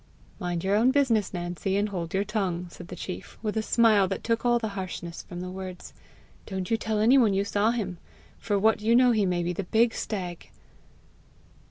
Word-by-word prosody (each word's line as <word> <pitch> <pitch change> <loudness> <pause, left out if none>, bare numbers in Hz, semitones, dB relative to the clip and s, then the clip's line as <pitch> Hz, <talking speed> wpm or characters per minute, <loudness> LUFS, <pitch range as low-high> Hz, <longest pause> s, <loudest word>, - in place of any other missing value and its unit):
"Mind 175 -3 -2
your 195 +1 +2
own 230 +4 +4
business, 255 -7 +2
Nancy, 175 +2 -2
and 205 +1 +1
hold 170 -4 -4
your 195 +1 +1
tongue," 190 -5 -2
said 175 - -11
the 180 - -7
chief, 180 +1 -7
with 215 -1 -2
a 220 - +1
smile 215 -3 +4
that - - -4
took 230 0 0
all 240 -1 +4
the 225 -2 -2
harshness 185 -3 -6
from 175 -1 -8
the 180 0 -5
words. 185 -1 -8 0.5
"Don't 190 -1 -4
you - - +5
tell 220 -1 -2
any 235 +6 +5
one 215 -6 +3
you 200 +1 +1
saw 205 +2 +1
him. 200 -7 -2 0.4
For 205 -2 0
what 220 +2 +3
you 225 +2 +3
know 250 0 +6
he 215 -4 +2
may 175 -1 0
be 175 +1 -1
the 190 +2 -4
big 225 +4 +3
stag!" 180 -5 -5
200 Hz, 210 wpm, -27 LUFS, 180-220 Hz, 0.5 s, know